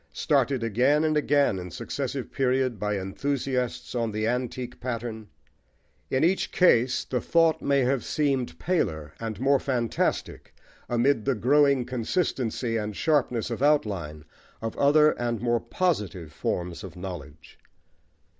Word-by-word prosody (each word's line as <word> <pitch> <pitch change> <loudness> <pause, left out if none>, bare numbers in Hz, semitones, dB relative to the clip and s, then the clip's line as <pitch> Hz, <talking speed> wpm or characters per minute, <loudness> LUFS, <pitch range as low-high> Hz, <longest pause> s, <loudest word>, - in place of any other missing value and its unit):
Started 135 -4 +1
again 125 +7 +2
and 155 -1 +1
again 145 -8 +2
in 90 0 -7
successive 80 - -4
periods 130 -2 +1
by 105 0 -1
enthusiasts 125 +5 -2
on 115 -2 -1
the 110 +1 -2
antique 125 +1 -3
pattern, 115 -3 -5 0.8
in 130 - +1
each 180 +4 +1
case 130 -9 +3
the 125 - -2
thought 165 -1 +3
may 140 -1 +2
have 130 0 +1
seemed 135 - -1
paler 80 - -1
and 110 -3 -5
more 135 +1 +3
fantastic 125 -4 -2 0.3
amid 120 -1 +2
the 135 - +2
growing 140 +2 +3
consistency 125 -2 -1
and 105 -1 -3
sharpness 125 -6 +1
of 115 - -4
outline 95 - 0 0.3
of 115 0 -4
other 150 +2 +5
and 120 -2 -1
more 120 +1 +1
positive 105 - -2
forms 85 +3 -3
of 95 -4 -9
knowledge. 80 -4 -9
120 Hz, 135 wpm, -26 LUFS, 105-140 Hz, 0.8 s, other